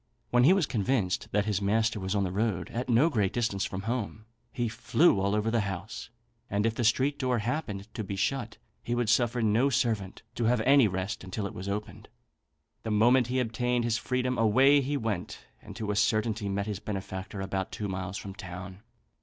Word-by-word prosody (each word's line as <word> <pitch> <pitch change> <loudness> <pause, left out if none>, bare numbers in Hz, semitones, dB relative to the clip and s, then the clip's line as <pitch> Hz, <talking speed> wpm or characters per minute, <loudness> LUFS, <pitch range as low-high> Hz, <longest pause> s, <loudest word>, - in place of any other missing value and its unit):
When 120 0 +5
he 160 - +7
was 190 -5 +2
convinced 105 -5 0
that 105 0 +1
his 105 -2 0
master 110 +2 +1
was 95 +1 -2
on 100 - +2
the 90 - -2
road, 100 -4 -1
at 125 +2 -3
no 125 +7 +5
great 105 - +1
distance 115 -5 -1
from 95 0 -5
home, 110 -2 -3 0.3
he 120 0 -1
flew 115 - +3
all 100 +2 +1
over 105 +1 0
the 115 - +2
house; 100 +2 -5 0.4
and 100 +1 0
if 115 - +2
the 120 - -2
street 130 +6 +2
door 125 -2 +1
happened 105 -4 -3
to 110 - -4
be 100 0 -4
shut, 120 +3 -2 0.2
he 120 - -2
would 120 -3 0
suffer 120 +1 +2
no 110 +6 +3
servant 110 -6 -1
to 120 - -2
have 120 +1 +3
any 135 0 +5
rest 95 +1 -3
until 95 +2 -4
it 100 - -5
was 95 +2 -6
opened. 105 +1 -5 0.7
The 110 - -5
moment 120 +4 +4
he 130 +1 0
obtained 125 0 0
his 115 -1 0
freedom 125 -1 -1
away 130 +6 +5
he 140 +2 -1
went, 110 -7 -4 0.2
and - - -11
to 110 -2 -3
a - - -1
certainty 110 0 +1
met 100 0 -1
his 105 -3 -4
benefactor 95 -1 -5
about 95 0 -3
two 105 - -4
miles 95 0 -4
from 95 - -7
town. 95 -1 -8
110 Hz, 205 wpm, -29 LUFS, 100-120 Hz, 0.7 s, he